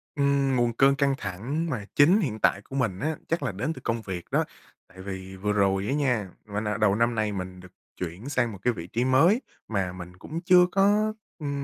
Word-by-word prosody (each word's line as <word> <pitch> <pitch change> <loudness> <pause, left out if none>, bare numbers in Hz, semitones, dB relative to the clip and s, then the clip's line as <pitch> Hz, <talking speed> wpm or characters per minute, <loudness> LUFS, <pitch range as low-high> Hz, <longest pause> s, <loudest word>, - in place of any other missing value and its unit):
Ừm, 140 -2 +2
nguồn 120 -1 +2
cơn 135 +3 +4
căng 140 0 +2
thẳng 125 - -3
mà 110 -8 -3
chính 170 +8 +6
hiện 110 - -2
tại 100 - +2
của 135 - -10
mình 115 -9 0
á, 155 +1 -1
chắc 165 +1 -1
là - - -1
đến 130 +12 -2
từ - - -11
công 115 0 -1
việc 90 -4 -6
đó. - - +3 0.4
Tại 95 0 -13
vì 95 -1 -7
vừa 105 +2 -1
rồi 95 -1 +2
á 135 - 0
nha, 125 -9 0 0.2
mình, 105 +1 -1
à 105 - -1
đầu 100 -2 +3
năm 115 +1 +1
nay 110 -1 0
mình 90 -1 -5
được 90 0 -14 0.3
chuyển 90 +9 -5
sang 125 -4 +1
một 100 - -8
cái 125 +1 +2
vị 85 -3 -7
trí 120 +6 -1
mới 165 - +4 0.3
mà 95 -4 -1
mình 90 0 -10
cũng 160 - -6
chưa 180 0 +7
có, 205 +2 +3 0.3
ừm, 140 -2 -3
115 Hz, 230 wpm, -26 LUFS, 95-140 Hz, 0.4 s, chưa